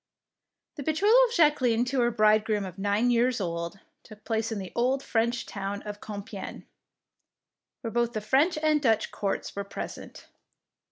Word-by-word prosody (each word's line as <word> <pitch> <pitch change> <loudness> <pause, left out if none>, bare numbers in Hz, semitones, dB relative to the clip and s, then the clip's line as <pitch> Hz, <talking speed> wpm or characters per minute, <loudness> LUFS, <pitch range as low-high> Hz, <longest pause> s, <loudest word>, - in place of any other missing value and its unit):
The - - -4
betrothal 350 - +3
of 470 - -5
Jacqueline 255 -7 +3
to 255 +1 -1
her 240 -1 +3
bridegroom 215 -2 +2
of 185 0 -9
nine 205 +5 +2
years 240 +1 +2
old 170 0 -4 0.2
took 215 -1 -15
place 225 0 -1
in 220 - -2
the 190 -2 -6
old 260 +3 +1
French 235 +1 0
town 200 0 -5
of 210 -1 -7
Com 205 -2 -6
piegne, 200 -3 -8 1.2
where 230 - -4
both 235 0 0
the 215 - -1
French 280 - +2
and 305 -1 +3
Dutch 225 -5 +2
courts 200 -2 -3
were 200 - -2
present. 200 - -8
225 Hz, 165 wpm, -27 LUFS, 205-250 Hz, 1.2 s, betrothal